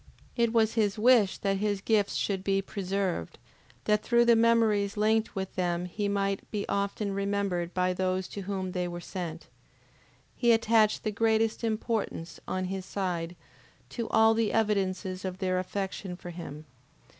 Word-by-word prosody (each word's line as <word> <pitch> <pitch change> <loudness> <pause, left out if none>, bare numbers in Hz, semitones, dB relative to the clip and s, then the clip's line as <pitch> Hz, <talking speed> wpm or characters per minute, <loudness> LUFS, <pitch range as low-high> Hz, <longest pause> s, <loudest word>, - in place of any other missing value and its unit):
It 235 -2 +2
was 225 -1 +3
his 210 -3 +1
wish 225 -3 +4
that 195 -1 0
his 205 0 0
gifts 205 0 +1
should 195 -2 -1
be 195 0 +2
preserved, 195 - -3 0.5
that 210 0 +2
through 235 +2 +3
the 235 -1 +6
memories 225 -3 +3
linked 220 +1 +2
with 190 -1 -4
them 175 -1 -1
he 205 +3 -3
might 200 -1 -1
be 205 -2 -3
often 200 0 -1
remembered 200 -3 -1
by 185 0 +2
those 185 0 -1
to 200 - -6
whom 190 -1 -3
they 180 -1 -2
were 175 0 -5
sent. 170 -2 -6 0.9
He 240 -1 +4
attached 225 -1 +3
the 215 - -1
greatest 220 +1 +1
importance, 220 -6 -2
on 185 0 -2
his 190 0 -4
side, 180 -4 -3 0.5
to 235 -2 -4
all 220 0 +5
the 225 -2 +1
evidences 190 -3 0
of 185 -1 -4
their 185 -1 0
affection 190 0 -4
for 175 0 -9
him. 155 -3 -8
200 Hz, 160 wpm, -29 LUFS, 185-220 Hz, 0.9 s, the